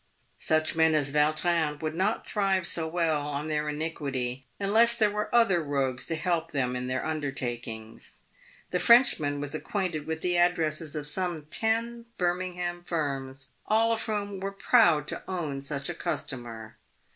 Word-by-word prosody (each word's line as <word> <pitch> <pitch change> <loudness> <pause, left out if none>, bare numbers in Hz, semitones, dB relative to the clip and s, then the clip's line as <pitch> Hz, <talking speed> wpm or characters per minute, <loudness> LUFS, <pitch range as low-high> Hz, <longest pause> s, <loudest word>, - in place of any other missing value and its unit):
Such 155 0 +1
men 160 -1 +4
as 140 -2 0
Yautrin 155 0 +2
would 155 -1 -3
not 190 +6 -1
thrive 195 -3 +1
so 165 -2 +1
well 160 -2 +1
on 145 +1 -4
their 150 0 -1
iniquity 135 -5 -3
un 200 0 -1
less 235 +1 +6
there 215 -3 +3
were 210 0 -2
other 230 -8 +4
rogues 135 -3 -1
to 165 - -1
help 165 0 -1
them 125 -5 -1
in 125 0 -3
their 130 0 -2
undertakings. 120 -7 -4 0.6
The - - +1
Frenchman 195 - +5
was 145 0 -5
acquainted 165 -2 -2
with 160 0 -3
the 180 -1 +1
addresses 165 -3 +1
of 150 -1 -3
some 170 0 -2
ten 230 +1 0
Birmingham 175 -1 -2
firms, 135 -5 -3 0.2
all 225 +2 +3
of 225 - -1
whom 205 -2 -3
were 195 +1 -3
proud 195 - +4
to - - -3
own 155 -7 -3
such 140 0 -4
a - - -2
customer. 115 -4 -5
160 Hz, 160 wpm, -28 LUFS, 145-185 Hz, 0.6 s, less